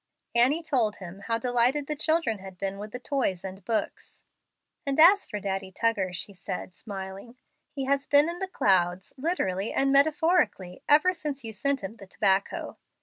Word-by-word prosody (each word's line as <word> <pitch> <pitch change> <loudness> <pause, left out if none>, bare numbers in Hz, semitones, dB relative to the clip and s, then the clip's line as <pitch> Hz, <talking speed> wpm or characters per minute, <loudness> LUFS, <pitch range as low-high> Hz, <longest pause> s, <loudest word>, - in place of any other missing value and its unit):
Annie 260 +8 +3
told 240 -9 +1
him 185 0 -10
how 230 -1 +1
delighted 245 +4 +1
the 300 - -3
children 310 -8 +1
had 190 -1 -11
been 195 +1 -4
with 210 +1 -7
the 250 - -5
toys 250 -9 -2
and 190 0 -8
books. 220 +3 -4 0.6
"And 275 -1 -1
as 380 +6 +7
for 210 - -4
Daddy 195 -1 -3
Tuggar," 200 -2 0
she 180 +3 -6
said, 180 0 -6
smiling, 195 +4 -8 0.3
"he 275 -2 -4
has 280 +1 0
been 290 +1 +5
in 345 +1 -4
the 385 - -2
clouds, 190 - +1
literally 230 - -1
and 275 0 +1
metaphorically, 290 - +2
ever 310 +5 +6
since 295 -5 -5
you 225 -1 -6
sent 275 +3 -1
him 210 +4 -6
the 195 - -12
tobacco. 195 0 0
230 Hz, 175 wpm, -27 LUFS, 195-285 Hz, 0.6 s, as